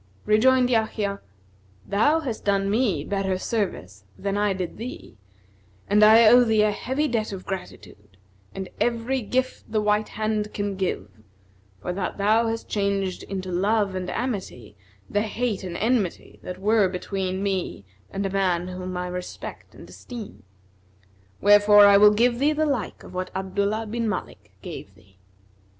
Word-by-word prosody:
Rejoined 250 +4 +4
Yahya, 215 -3 0 0.6
"Thou 290 +11 +2
hast 250 -7 -5
done 200 -1 +1
me 210 - +1
better 195 +1 -1
service 180 - -3
than 200 0 -2
I 205 0 +1
did 185 -2 -4
thee 235 - -8 0.7
and 210 +1 +4
I 220 +2 +8
owe 245 +3 +8
thee 220 -2 +3
a 210 - +3
heavy 265 +8 -1
debt 225 -4 -1
of 190 -2 -7
gratitude 105 - -8 0.4
and 190 -1 -5
every 240 +2 0
gift 255 +4 -2
the 220 - +1
white 210 0 +1
hand[FN#251] 215 -1 -2
can 205 -1 -2
give, 185 - -2 0.8
for 180 - -2
that 185 0 -3
thou 215 +3 +3
hast 225 0 -3
changed 200 -2 -1
into 185 -1 -5
love 200 +2 +1
and 185 -1 -4
amity 190 - -4 0.3
the 205 - 0
hate 220 -1 -2
and 175 -2 -5
enmity 220 -4 -1
that 180 - -7
were 205 0 +3
between 190 +1 -3
me 190 - -2 0.2
and 200 - -3
a - - 0
man 185 -2 0
whom 185 0 -5
I 180 - -2
respect 180 0 -7
and - - -12
esteem. 225 - -10 1.0
Wherefore 205 0 +7
I 200 0 +7
will 210 +1 +8
give 240 +2 +2
thee 295 +3 +3
the 310 +1 +1
like 275 -7 -3
of - - -12
what 185 0 -3
Abdullah 200 +3 -1
bin 230 +1 -2
Malik - - -6
gave - - -8
thee." 95 0 -24
205 Hz, 160 wpm, -24 LUFS, 185-225 Hz, 1.0 s, I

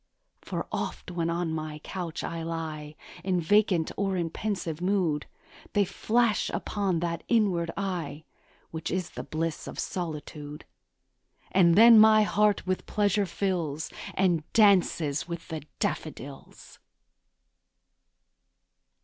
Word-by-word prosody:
For - - -4
oft, - - -4
when 170 -1 -1
on 170 -1 -1
my 155 -1 -4
couch 175 -3 -5
I 165 0 -4
lie 160 -2 -5 0.3
In 185 -2 +1
vacant 180 -1 +3
or 195 -1 0
in 170 -2 -1
pensive 175 -7 -3
mood, 180 -6 0 0.5
They 205 -1 +3
flash 230 +3 +1
upon 195 -5 -1
that 170 -1 -2
inward 195 -8 +2
eye 175 -6 -3 0.5
Which 160 0 -4
is 185 -1 -2
the - - -6
bliss 160 0 -3
of - - -7
solitude; 150 -3 -5 0.9
And 170 -3 +5
then 230 +2 +9
my 215 0 +7
heart 210 0 +2
with 185 0 -2
pleasure 205 -1 +1
fills, 170 -5 -2 0.2
And 180 -4 +2
dances 180 -8 +3
with 170 -1 -6
the 160 -2 -4 0.2
daffodils. 140 -3 -5
175 Hz, 120 wpm, -28 LUFS, 160-200 Hz, 0.9 s, then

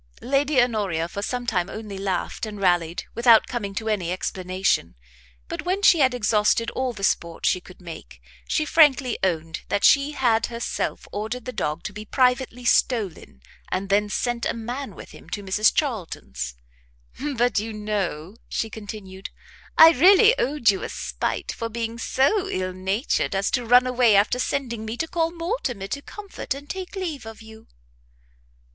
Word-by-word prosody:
Lady 275 +1 +2
Honoria 205 -9 +1
for 200 - -6
some 245 +3 -3
time 180 -5 0
only 215 -2 -7
laughed 195 +3 -2
and 210 -1 -7
rallied, 175 -3 +1
without 235 -1 +6
coming 205 -5 -4
to 220 - -3
any 190 -6 -1
explanation; 185 - -1 0.5
but - - -4
when 380 +3 -1
she 345 - +6
had 260 -3 +3
exhausted 225 +1 +2
all 260 0 -1
the 205 -4 -9
sport 170 -3 0
she 180 - +2
could 185 - -15
make, 170 -3 -10 0.3
she 310 - +1
frankly 285 -6 +4
owned 165 -3 -1
that 200 - 0
she 280 +1 +5
had 235 -5 +2
herself 235 0 -4
ordered 220 +4 -4
the 255 - -5
dog 160 -5 -2
to 210 - -5
be 210 +1 -7
privately 250 +1 +1
stolen, 205 - 0 0.3
and 190 +1 -2
then 205 +1 +2
sent 240 +2 -2
a - - -2
man 245 +5 -5
with - - -11
him - - -14
to 205 - -4
Mrs 205 +3 +3
Charlton's. 65 - -3 0.8
"But 245 -2 +2
you 220 +2 -4
know," 205 -4 -3
she 225 - -2
continued, 200 -3 -8 0.5
"I 325 0 +10
really 390 - +6
owed 250 -4 +3
you 195 - -4
a - - -4
spite - - -3
for 230 - -5
being 230 0 -4
so 365 - +1
ill 185 0 -2
natured 195 +4 -1
as 195 +1 0
to 245 -3 -1
run 245 +2 +6
away 250 -4 +4
after 205 +5 +3
sending 245 -4 -2
me 220 +2 -5
to 320 - -2
call 330 -1 0
Mortimer 335 - -3
to 280 - -3
comfort 400 -5 -6
and 285 +1 -10
take 375 +3 -6
leave 320 - -4
of 225 0 -10
you." 220 0 -14
225 Hz, 170 wpm, -24 LUFS, 195-260 Hz, 0.8 s, I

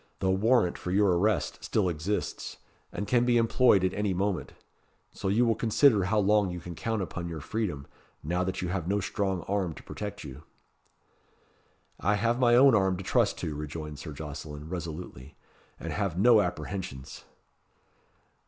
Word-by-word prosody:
The 95 -1 +1
warrant 105 -1 +2
for - - -5
your 95 -1 +3
arrest 105 +4 0
still 100 -4 +1
exists, 90 +5 -3 0.3
and 100 - -4
can 120 -1 +3
be 120 -1 +3
employed 115 -3 +4
at 95 - +1
any 105 -2 -1
moment; 95 0 -2 0.6
so - - -5
you 110 +6 +3
will 115 - +3
consider 110 -2 +3
how 110 +4 +1
long 105 -1 +3
you 90 0 -5
can 85 +1 -8
count 110 +4 -2
upon 90 -1 -5
your 80 -1 -5
freedom, 85 -5 -3 0.4
now 90 +4 0
that 95 0 -3
you 90 - -2
have 90 -2 -2
no 100 +2 +1
strong 95 -1 -2
arm 95 -5 -2
to - - -12
protect 105 -1 -6
you." 70 -1 -9 1.6
"I 105 - +2
have 115 +4 0
my 120 -2 +5
own 135 +1 +7
arm 95 -3 +2
to 95 - -6
trust - - +1
to," 75 - -3
rejoined 75 0 -6
Sir 75 - -7
Jocelyn, 75 0 -7
resolutely, 85 -5 -7 0.4
"and - - -5
have 100 -5 -2
no 110 +2 +6
apprehensions." 90 -11 -5
95 Hz, 170 wpm, -28 LUFS, 85-105 Hz, 1.6 s, own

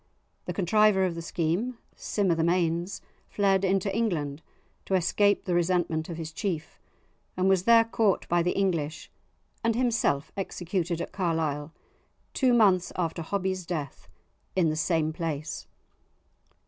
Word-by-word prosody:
The - - -3
contriver 200 0 +3
of 180 - -1
the 170 - -6
scheme, 175 +9 -1 0.2
Sim 200 -4 0
o' - - +5
the 165 0 0
Mains, 170 +1 0 0.3
fled 195 -2 +2
into 195 +1 +1
England 160 -10 -1 0.4
to 190 - 0
escape 200 +3 +2
the 180 - -1
resentment 175 -2 0
of 170 - -5
his 160 -1 -5
chief, 160 -4 -4 0.6
and 185 +1 +2
was 190 -1 +3
there 230 -1 +7
caught 220 -3 +1
by 175 0 +2
the 180 +1 +1
English, 165 -6 -1 0.5
and 230 -1 +2
himself 230 - +1
executed 175 -3 -2
at - - -5
Carlisle, 160 -5 -1 0.6
two 260 -2 +3
months 200 -7 +4
after 170 -1 -2
Hobbie's 185 +1 -2
death 160 -6 -5 0.5
in 175 -4 +3
the - - -2
same 160 0 0
place! 155 -3 -4
180 Hz, 145 wpm, -27 LUFS, 165-195 Hz, 0.6 s, there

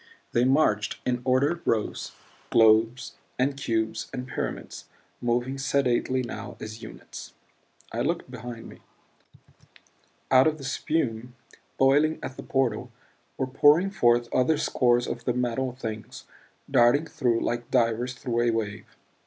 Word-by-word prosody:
They 120 +1 +2
marched 130 -6 +2
in 125 -1 0
ordered 140 +6 +2
rows, 110 -2 -1 0.4
globes 115 +3 +3 0.2
and 135 +2 +1
cubes 110 -4 -2
and 125 -1 -5
pyramids; 130 - -5 0.4
moving 120 +3 -1
sedately 130 -1 +1
now 110 -3 -7
as 110 +1 -8
units. 110 - -10 0.6
I 115 - -1
looked 160 -1 -2
behind 120 -1 -8
me; - - -13 1.5
out 130 +2 +6
of 155 0 0
the 140 - -10
spume 125 -4 -2 0.4
boiling 145 +4 +4
at 130 - -5
the - - -8
portal, 125 -3 -1 0.5
were 130 - 0
pouring 145 +8 +4
forth 120 -8 +3
other 135 +5 +3
scores 120 -3 +2
of 115 - -5
the 125 - +1
Metal 125 +1 -1
Things, 110 -4 -7 0.4
darting 120 +6 +4
through 120 -7 0
like 120 0 -2
divers 120 0 +1
through 120 -1 -1
a 120 - +2
wave. 110 -2 -3
125 Hz, 135 wpm, -26 LUFS, 115-135 Hz, 1.5 s, out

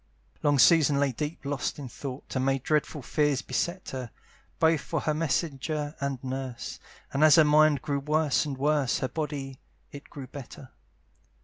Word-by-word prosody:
Long 145 -1 +3
Susan 150 -1 +5
lay 140 -1 +2
deep 150 +5 -5
lost 140 0 -2
in 140 -3 -6
thought, 130 +2 -8
And 130 - +1
many 135 0 +2
dreadful 150 +1 -1
fears 145 0 +1
beset 180 +2 -2
her, 130 -3 -5 0.5
Both 160 -2 +3
for 155 +2 -3
her 155 - 0
messenger 150 -1 -1
and 140 -1 -2
nurse; 130 -2 -5 0.3
And 140 +2 +2
as 155 -2 +8
her 160 - +7
mind 150 -1 +4
grew 140 -2 -1
worse 150 0 +1
and 145 -3 -4
worse, 145 -2 +1
Her 130 - -1
body 140 -3 -5 0.3
it 140 0 -11
grew 140 -2 -8
better. 130 0 -10
145 Hz, 170 wpm, -28 LUFS, 135-155 Hz, 0.5 s, as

